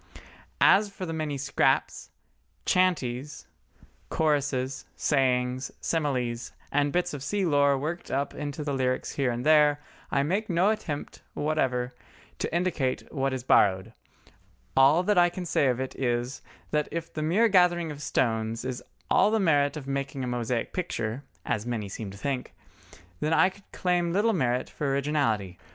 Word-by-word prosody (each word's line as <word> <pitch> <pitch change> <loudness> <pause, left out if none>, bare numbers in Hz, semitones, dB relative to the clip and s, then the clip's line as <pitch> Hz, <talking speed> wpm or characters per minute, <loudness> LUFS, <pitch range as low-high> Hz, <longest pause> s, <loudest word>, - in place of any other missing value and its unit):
As 205 +1 +5
for 195 -2 -6
the 165 - -4
many 155 -3 -2
scraps, 140 +1 0 0.6
"chanties," 150 -7 0 0.6
choruses, 140 -4 0
sayings, 130 -2 +1
similes, 125 -7 -1 0.2
and 145 0 +2
bits 180 +1 0
of 145 - -5
sea 195 +7 -1
lore 140 -3 +3
worked 160 +6 -4
up 140 +1 -1
into 145 +1 -5
the 145 -1 -2
lyrics 130 -1 -1
here 135 -3 0
and 120 +2 -3
there, 150 -1 +5 0.3
I 140 -1 +1
make 195 +8 -1
no 180 +4 +3
attempt 155 -9 -5
whatever 130 -5 0 0.5
to - - -2
indicate 165 -7 -1
what 135 -2 0
is 130 -2 -4
borrowed; 100 -2 +3 0.8
all 140 +6 +5
that 205 -1 +3
I 175 0 +5
can 180 +1 -6
say 150 -4 +2
of 125 -1 +1
it 130 0 -3
is, 120 0 -2 0.3
that 150 -1 +1
if 165 0 -5
the 155 - -3
mere 185 +10 +3
gathering 180 -4 +3
the 145 -1 -7
stones 115 -4 -1
is 130 -1 -3 0.3
all - - +5
the 220 +1 +2
merit 145 -5 +2
of 145 - -7
making 140 -1 -3
a - - -2
mosaic 120 -1 -2
picture 125 -9 -3 0.2
(as 105 +2 -2
many 115 -4 -2
seem 100 +1 -6
to 100 - -10
think), 135 +3 -3 0.6
then 155 +2 0
I 185 - +5
could 200 +1 -19
claim 175 -2 0
little 215 +4 +3
merit 125 - 0
for 145 - -4
originality. 125 - 0
140 Hz, 160 wpm, -27 LUFS, 125-165 Hz, 0.8 s, As